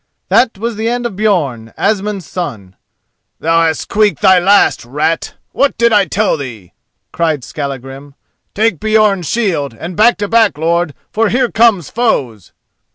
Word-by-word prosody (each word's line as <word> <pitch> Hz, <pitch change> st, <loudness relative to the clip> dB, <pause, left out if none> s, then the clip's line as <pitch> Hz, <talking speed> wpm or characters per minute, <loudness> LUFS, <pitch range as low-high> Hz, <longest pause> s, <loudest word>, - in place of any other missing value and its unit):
That 240 Hz, -5 st, +2 dB
was 230 Hz, +1 st, -4 dB
the 225 Hz, +1 st, -1 dB
end 245 Hz, 0 st, -2 dB
of 235 Hz, -, -3 dB
Björn, 155 Hz, -, -1 dB
Asmund's 205 Hz, -3 st, -1 dB
son. 110 Hz, -, -6 dB, 0.6 s
"Thou 165 Hz, +1 st, +2 dB
hast 160 Hz, -2 st, -2 dB
squeaked 210 Hz, -3 st, 0 dB
thy 190 Hz, -2 st, +6 dB
last, 200 Hz, +3 st, +3 dB
rat! 150 Hz, +6 st, -2 dB, 0.2 s
What 280 Hz, -, 0 dB
did 235 Hz, -1 st, +3 dB
I 205 Hz, -2 st, +4 dB
tell 200 Hz, +2 st, 0 dB
thee?" 115 Hz, -, -9 dB, 0.4 s
cried 160 Hz, -5 st, -1 dB
Skallagrim. 135 Hz, 0 st, -7 dB, 0.4 s
"Take 215 Hz, -6 st, +1 dB
Björn's 215 Hz, -6 st, +1 dB
shield 165 Hz, -, -1 dB
and 170 Hz, +8 st, -7 dB
back 230 Hz, +5 st, +4 dB
to 205 Hz, -, -2 dB
back, 225 Hz, -5 st, +2 dB
lord, 165 Hz, -1 st, 0 dB, 0.2 s
for 220 Hz, 0 st, +1 dB
here 245 Hz, 0 st, 0 dB
come 225 Hz, -6 st, +3 dB
foes." 130 Hz, -, -2 dB
185 Hz, 155 wpm, -14 LUFS, 145-215 Hz, 0.6 s, thy